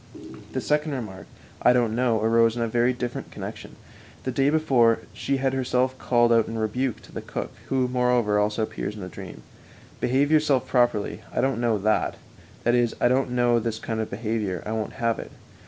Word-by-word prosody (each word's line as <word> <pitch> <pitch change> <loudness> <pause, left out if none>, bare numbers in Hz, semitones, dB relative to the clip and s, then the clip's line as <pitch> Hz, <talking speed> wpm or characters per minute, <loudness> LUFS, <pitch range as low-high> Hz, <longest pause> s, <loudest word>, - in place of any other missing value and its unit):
The - - -1
second 150 0 0
remark, 105 -8 -6 0.3
"I 125 - +6
don't 120 -3 +2
know 120 -2 +2
that" 110 - -1
arose 115 0 +4
in 120 - -1
a - - 0
very 120 +2 +2
different 125 -1 -4
connection. - - -8 0.5
The 130 - -2
day 135 +2 +2
before 130 -7 +4 0.2
she 140 - -1
had 135 0 0
herself 130 0 +1
called 120 -1 +3
out 115 -1 +3
in 115 - -4
rebuke 115 +3 -1
to - - -15
the - - -6
cook - - -5 0.2
(who, 130 -1 +1
moreover, 125 -4 +2
also 105 +2 +1
appears 105 -1 -4
in 105 - -8
the 90 - -6
dream): - - -10 0.6
"Behave 135 +4 +2
yourself 150 -5 +3
properly; 120 -5 +1
I - - -2
don't 135 -3 +1
know 115 -3 +2
that" 105 +2 +1 0.5
that 120 - +3
is, 120 -1 +2
"I 120 - +4
don't 130 +1 +2
know 120 -1 +3
this 115 -1 -2
kind 110 0 -4
of 110 - -2
behavior; 105 -4 -2
I 110 - -4
won't 110 -2 -3
have 115 -3 -1
it." - - -7
120 Hz, 205 wpm, -25 LUFS, 110-130 Hz, 0.6 s, I